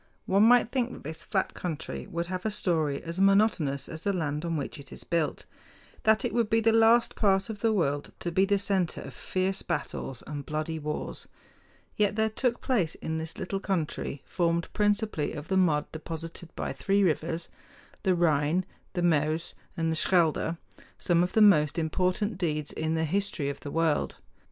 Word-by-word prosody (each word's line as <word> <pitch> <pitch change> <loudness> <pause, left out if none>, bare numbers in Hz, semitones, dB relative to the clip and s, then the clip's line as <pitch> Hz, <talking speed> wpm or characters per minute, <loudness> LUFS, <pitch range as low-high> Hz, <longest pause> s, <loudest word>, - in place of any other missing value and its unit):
One 195 +2 +3
might 235 +1 +6
think 250 -2 0
that - - -10
this 160 +2 -4
flat 190 +2 -1
country 165 -5 -5
would 170 0 -3
have 180 +1 -4
a 220 - 0
story 160 -8 0
as 170 +2 -5
monotonous 195 -9 +3
as 160 -1 -8
the 200 - +1
land 150 -5 -2
on 165 -1 -1
which 145 +2 -4
it 140 -2 -11
is - - -5
built, 165 -3 -1 0.6
that 220 +3 +4
it 245 - -2
would 235 -3 +1
be 225 - +4
the 225 0 +4
last 225 +1 +5
part 195 0 +2
of 210 - -8
the 225 +1 +2
world 145 -8 0
to 175 - -2
be 185 +3 +3
the 200 0 +2
center 190 -4 0
of - - -9
fierce 190 +1 -2
battles 135 - -4
and 145 -1 -5
bloody 155 +1 -2
wars. 150 0 -4 0.7
Yet 205 -1 +2
there 220 0 +1
took 240 +2 0
place 200 -12 +1
in 160 0 -3
this 160 0 -5
little 195 +1 -3
country, 165 -7 -2
formed 170 -2 0
principally 205 -6 +1
of 145 0 -7
the 190 - +1
mud 160 -5 +3
deposited 165 +1 -6
by - - -3
three 195 +10 +1
rivers, 165 -1 0 0.5
the 190 -3 +2
Rhine, 165 +1 +2 0.3
the 175 -2 -1
Meuse, 160 0 +1 0.2
and 165 -1 +1
the - - 0
Schelde, 165 -1 +2 0.4
some 175 -1 +2
of 180 +1 0
the 220 - +6
most 150 -8 +5
important 185 +5 0
deeds 155 -4 -1
in 160 +1 -1
the 160 0 +1
history 175 -4 -1
of 140 - -5
the 145 - -7
world. 160 -1 +1
170 Hz, 190 wpm, -28 LUFS, 155-200 Hz, 0.7 s, might